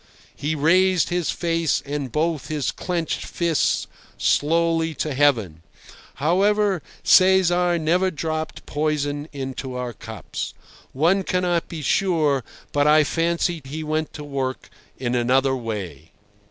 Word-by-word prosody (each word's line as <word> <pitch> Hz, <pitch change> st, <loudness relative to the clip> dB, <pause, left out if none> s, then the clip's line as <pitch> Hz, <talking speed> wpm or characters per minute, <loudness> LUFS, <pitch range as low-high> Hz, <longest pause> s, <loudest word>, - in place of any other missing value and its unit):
He 150 Hz, +2 st, -2 dB
raised 180 Hz, +4 st, +3 dB
his 175 Hz, -2 st, -1 dB
face 165 Hz, -3 st, 0 dB
and 140 Hz, -3 st, -4 dB
both 155 Hz, 0 st, -1 dB
his 150 Hz, -4 st, -1 dB
clenched 170 Hz, -3 st, -3 dB
fists 170 Hz, -4 st, 0 dB, 0.3 s
slowly 165 Hz, +1 st, +1 dB
to 150 Hz, 0 st, -2 dB
heaven. 115 Hz, -, +2 dB, 0.5 s
However, 195 Hz, -, +2 dB, 0.2 s
Cesar 180 Hz, -2 st, +5 dB
never 175 Hz, +4 st, +2 dB
dropped 160 Hz, -1 st, -4 dB
poison 145 Hz, -1 st, -1 dB
into 135 Hz, -2 st, -5 dB
our 125 Hz, -1 st, -4 dB
cups. -, -, -7 dB, 0.4 s
One 170 Hz, +8 st, +2 dB
cannot 180 Hz, -2 st, 0 dB
be 160 Hz, -3 st, -6 dB
sure, 155 Hz, -7 st, +2 dB, 0.3 s
but 145 Hz, 0 st, +2 dB
I 155 Hz, 0 st, +6 dB
fancy 170 Hz, +1 st, 0 dB
he 150 Hz, +4 st, -6 dB
went 155 Hz, 0 st, -2 dB
to 150 Hz, -, -7 dB
work 135 Hz, -2 st, -4 dB, 0.3 s
in 125 Hz, -2 st, -2 dB
another 130 Hz, +2 st, +2 dB
way. 95 Hz, -, -6 dB
155 Hz, 125 wpm, -23 LUFS, 135-170 Hz, 0.5 s, I